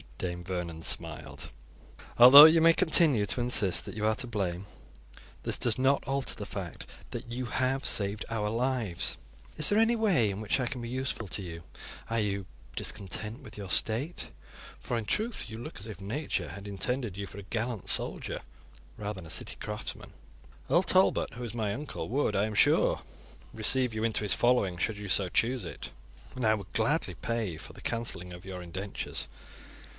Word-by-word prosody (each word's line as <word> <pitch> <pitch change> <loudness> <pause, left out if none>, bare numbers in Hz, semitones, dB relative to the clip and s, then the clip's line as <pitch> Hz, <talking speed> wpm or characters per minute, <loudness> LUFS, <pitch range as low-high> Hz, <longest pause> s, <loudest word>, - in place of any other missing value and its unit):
Dame 90 -1 -4
Vernon 85 -3 -4
smiled. - - 0 0.7
"Although 135 +5 +12
you 160 +1 +6
may 165 +1 +7
continue 160 - +5
to 120 - +2
insist 115 -6 +3
that - - -8
you 105 -1 -2
are 110 0 +2
to 125 +1 -4
blame, 100 -4 -3 0.8
this - - 0
does 115 -3 +2
not 135 +2 +3
alter 135 0 -1
the - - -6
fact - - -6 0.2
that 120 - -7
you 125 +1 -3
have 130 +2 0
saved 100 +1 +1
our 105 -2 -1
lives. 115 -5 -1 0.4
Is 155 - +6
there 210 - +4
any 225 +1 +4
way 190 - +3
in 100 0 -4
which 110 +5 0
I 125 - 0
can 130 -2 -4
be 120 - -5
useful 130 -3 -3
to 100 - -1
you? 85 -3 -8 0.5
Are 115 0 0
you 100 -2 -1 0.3
discontent 105 - -5
with 115 -6 -12
your 100 -3 -7
state? 120 - +1 0.5
For, 120 - -3
in 115 - -3
truth, 215 - -2
you 110 - -7
look 120 - -8
as 100 - -8
if 105 -3 -9
Nature 100 - -3
had 100 +5 -9
intended 110 +2 -3
you 100 - -4
for 100 - -9
a - - -8
gallant 115 +1 -3
soldier - - -1 0.6
rather 105 -2 -5
than - - -11
a - - -12
city - - +1
craftsman. 105 0 -6 0.6
Earl 175 - +4
Talbot, 185 0 +2
who 120 - -6
is 120 -1 -6
my 105 -3 -1
uncle, 145 -1 -5
would, 125 -4 0
I 100 +1 +2
am 110 0 -4
sure, - - +4 0.5
receive 125 +2 0
you 110 0 -3
into 115 -2 0
his 100 -3 +4
following 120 -8 +2
should 105 +5 -1
you 105 -1 -6
so 95 0 +2
choose 120 +4 +1
it, - - -7 0.5
and 125 -2 -2
I 110 - +5
would 100 -3 -9
gladly - - +1
pay 110 -8 -3
for - - -10
the - - -13
cancelling 90 -6 -3
of 90 +1 -11
your 95 -2 -6
indentures." 95 +3 -5
110 Hz, 190 wpm, -29 LUFS, 100-130 Hz, 0.8 s, Although